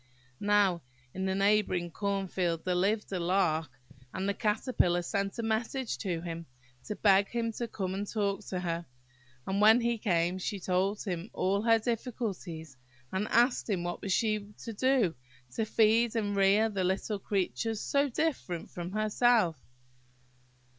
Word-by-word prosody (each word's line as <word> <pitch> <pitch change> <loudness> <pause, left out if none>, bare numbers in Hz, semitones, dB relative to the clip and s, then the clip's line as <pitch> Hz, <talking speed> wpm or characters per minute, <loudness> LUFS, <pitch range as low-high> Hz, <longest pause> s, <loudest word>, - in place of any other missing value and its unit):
Now, 205 -4 +3 0.3
in 190 +1 -3
the 190 0 0
neighbouring 195 -3 +2
corn 200 +2 -2
field 175 -3 -1
there 180 - +1
lived 200 +5 0
a 185 - -1
Lark, 170 -4 +1 0.4
and 190 - -3
the 200 - +1
Caterpillar 210 -5 +1
sent 200 +1 -2
a 230 - -2
message 225 +3 -1
to 175 -5 -2
him, 165 -1 -6 0.4
to 210 - -4
beg 200 -1 +4
him 230 -1 -1
to 235 +2 -4
come 190 -4 -3
and 200 +1 -4
talk 200 -2 -1
to 180 -1 -3
her; 170 -1 -3 0.6
and 195 +1 -1
when 220 +3 +7
he 235 -1 0
came 180 -3 +1
she 200 +2 -3
told 190 +3 0
him 180 +1 -4
all 195 +2 +1
her 225 0 +5
difficulties, 210 - -4 0.3
and 195 +3 -1
asked 240 +1 +2
him 185 -4 0
what 175 0 -3
she 215 +2 +2
was 205 0 -14
to 230 - -5
do, 250 -5 +2 0.4
to 220 - -1
feed 225 +2 +3
and 205 -3 0
rear 200 +3 +4
the 200 -4 -2
little 190 +3 -1
creatures 195 - -1
so 280 +4 +1
different 255 - -2
from 175 +1 -6
herself. 215 - +2
200 Hz, 160 wpm, -30 LUFS, 180-220 Hz, 0.6 s, when